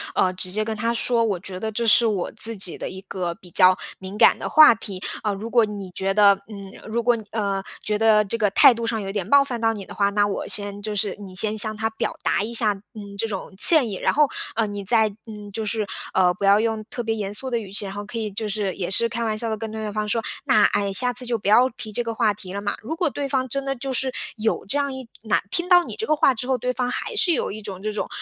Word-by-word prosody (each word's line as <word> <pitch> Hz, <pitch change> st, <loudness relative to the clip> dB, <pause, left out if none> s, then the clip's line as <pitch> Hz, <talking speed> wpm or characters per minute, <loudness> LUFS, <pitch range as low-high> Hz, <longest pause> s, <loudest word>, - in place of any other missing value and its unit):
呃， 185 Hz, -1 st, +2 dB
直 185 Hz, 0 st, -1 dB
接 215 Hz, +3 st, -1 dB
跟 220 Hz, 0 st, -3 dB
他 230 Hz, +2 st, -1 dB
说， 235 Hz, 0 st, +1 dB
我 205 Hz, -5 st, -1 dB
觉 185 Hz, 0 st, -7 dB
得 220 Hz, +2 st, -3 dB
这 235 Hz, +2 st, -2 dB
是 235 Hz, +2 st, +6 dB
我 205 Hz, -5 st, -1 dB
自 230 Hz, 0 st, -2 dB
己 190 Hz, -3 st, -1 dB
的 -, -, -5 dB
一 190 Hz, -, -7 dB
个 180 Hz, -3 st, -4 dB
比 180 Hz, -, -16 dB
较 185 Hz, 0 st, +5 dB, 0.2 s
敏 190 Hz, +2 st, -7 dB
感 -, -, +6 dB
的 -, -, -5 dB
话 310 Hz, -5 st, +8 dB
题。 200 Hz, -4 st, -7 dB, 0.2 s
啊， 210 Hz, -, -1 dB
如 215 Hz, +4 st, -6 dB
果 235 Hz, -1 st, +4 dB
你 205 Hz, -3 st, -5 dB
觉 195 Hz, 0 st, -1 dB
得 205 Hz, -1 st, +6 dB, 0.2 s
嗯， 200 Hz, -2 st, -9 dB, 0.2 s
如 235 Hz, +1 st, 0 dB
果 240 Hz, +1 st, +3 dB
你， 225 Hz, -, -7 dB
呃， 200 Hz, -3 st, -2 dB, 0.2 s
觉 210 Hz, 0 st, -1 dB
得 215 Hz, -1 st, +4 dB
这 230 Hz, +4 st, -2 dB
个 210 Hz, -3 st, +2 dB
态 245 Hz, -, +7 dB
度 230 Hz, 0 st, -4 dB
上 225 Hz, -1 st, -1 dB
有 195 Hz, -, -5 dB
点 205 Hz, -1 st, -3 dB
冒 280 Hz, 0 st, +6 dB
犯 245 Hz, -4 st, -5 dB
到 225 Hz, -, +3 dB
你 200 Hz, -3 st, -8 dB
的 -, -, -10 dB
话， 200 Hz, -1 st, +2 dB
那 205 Hz, 0 st, +2 dB
我 200 Hz, -, -3 dB
先 205 Hz, -1 st, -3 dB
就 215 Hz, +1 st, -4 dB
是 205 Hz, -1 st, -1 dB
你 200 Hz, -3 st, -10 dB
先 215 Hz, +3 st, +2 dB
向 215 Hz, 0 st, +1 dB
他 220 Hz, +1 st, -1 dB
表 220 Hz, -, -3 dB
达 -, -, +1 dB
一 230 Hz, +2 st, -5 dB
下， 220 Hz, -3 st, +2 dB
嗯， 200 Hz, 0 st, -12 dB
这 225 Hz, -, 0 dB
种 195 Hz, -2 st, -6 dB
歉 285 Hz, -, +7 dB
意。 200 Hz, -, -4 dB
然 -, -, 0 dB
后， 300 Hz, 0 st, +4 dB, 0.3 s
呃， 225 Hz, -1 st, +1 dB
你 205 Hz, -1 st, -6 dB
再， 220 Hz, +2 st, +4 dB, 0.2 s
嗯， 210 Hz, -2 st, -9 dB
就 220 Hz, -, -3 dB
是， 215 Hz, -1 st, -2 dB, 0.3 s
呃， 180 Hz, -1 st, +3 dB
不 195 Hz, -, -9 dB
要 200 Hz, +1 st, +5 dB
用 220 Hz, -1 st, -1 dB
特 245 Hz, -, -4 dB
别 225 Hz, 0 st, -1 dB
严 205 Hz, -2 st, -4 dB
肃 260 Hz, +5 st, -3 dB
的 240 Hz, -, 0 dB
语 210 Hz, -4 st, -7 dB
气， 200 Hz, +1 st, 0 dB
然 195 Hz, -, -6 dB
后 205 Hz, +1 st, -6 dB
可 220 Hz, +3 st, -7 dB
以 215 Hz, -1 st, -3 dB
就 210 Hz, +2 st, -4 dB
是 200 Hz, -2 st, -2 dB
也 185 Hz, -1 st, -4 dB
是 230 Hz, +4 st, +3 dB
开 235 Hz, +1 st, -3 dB
玩 215 Hz, -1 st, -1 dB
笑 230 Hz, 0 st, -2 dB
地 220 Hz, -, -2 dB
跟 220 Hz, 0 st, -6 dB
对 220 Hz, 0 st, -6 dB
对 215 Hz, -1 st, -4 dB
方 215 Hz, 0 st, -2 dB
说： 230 Hz, +2 st, 0 dB, 0.2 s
“那， 215 Hz, -, +4 dB
哎， 200 Hz, -1 st, +1 dB
下 245 Hz, +6 st, +1 dB
次 250 Hz, +1 st, +1 dB
就 235 Hz, -1 st, 0 dB
不 200 Hz, -, -7 dB
要 240 Hz, +5 st, +5 dB
提 230 Hz, -3 st, -8 dB
这 240 Hz, -, -1 dB
个 230 Hz, -1 st, -4 dB
话 220 Hz, -2 st, +1 dB
题 185 Hz, -2 st, -10 dB
了 200 Hz, -, -4 dB
嘛。” 205 Hz, -, -2 dB
如 315 Hz, +9 st, -4 dB
果 350 Hz, -3 st, +1 dB
对 280 Hz, 0 st, -4 dB
方 260 Hz, -1 st, 0 dB
真 275 Hz, +2 st, -2 dB
的 275 Hz, 0 st, -2 dB
就 265 Hz, +1 st, -4 dB
是 260 Hz, +1 st, 0 dB, 0.2 s
有 220 Hz, -1 st, -1 dB
这 275 Hz, -, -1 dB
样 280 Hz, -1 st, -1 dB
一 260 Hz, -2 st, -8 dB
哪 220 Hz, -1 st, +1 dB
听 350 Hz, +1 st, -1 dB
到 355 Hz, -1 st, +7 dB
你 -, -, -7 dB
这 445 Hz, -, -3 dB
个 310 Hz, -, +3 dB
话 285 Hz, -, +4 dB
之 245 Hz, +1 st, -6 dB
后， 260 Hz, -1 st, +1 dB
对 250 Hz, +1 st, -2 dB
方 250 Hz, -1 st, -2 dB
还 350 Hz, -, -4 dB
是 365 Hz, -4 st, +3 dB
有 -, -, -1 dB
一 215 Hz, +1 st, -7 dB
种 195 Hz, -3 st, -8 dB
这 215 Hz, +1 st, -3 dB
种， 210 Hz, -, -3 dB
215 Hz, 315 characters per minute, -23 LUFS, 200-235 Hz, 0.3 s, 话